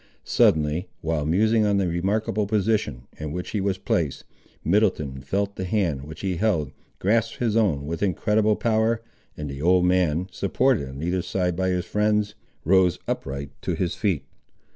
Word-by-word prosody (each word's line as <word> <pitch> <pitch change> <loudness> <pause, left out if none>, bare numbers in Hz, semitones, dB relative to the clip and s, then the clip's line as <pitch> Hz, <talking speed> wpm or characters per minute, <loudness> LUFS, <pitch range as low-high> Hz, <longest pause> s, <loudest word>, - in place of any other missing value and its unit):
Suddenly, 80 +4 +2
while 80 -3 -1
musing 110 +6 +3
on 100 -1 +2
the 95 -2 +1
remarkable 100 +4 0
position, 105 - 0 0.2
in 75 -1 -4
which 90 +3 -5
he 105 - -1
was 95 -1 0
placed, 80 -6 -1 0.4
Middleton 80 -8 +1
felt 100 +8 -2
the 95 - -3
hand, 90 -8 0
which 80 +1 -9
he 95 -3 -1
held, 85 -9 +1 0.3
grasp 115 +3 +1
his 115 -3 0
own 90 -11 +2
with 80 +2 -4
incredible 105 +2 +2
power, 110 0 +1 0.3
and 75 - -4
the 70 0 -6
old 90 +2 +4
man, 90 -1 +2
supported 100 - +1
on 70 +3 -7
either 90 +2 0
side 90 -1 -1
by 95 +1 0
his 90 -1 0
friends, 105 0 +1 0.3
rose 90 0 +4
upright 70 +1 -3
to - - -2
his 85 -2 -1
feet. 95 -4 -1
95 Hz, 165 wpm, -24 LUFS, 80-105 Hz, 0.4 s, old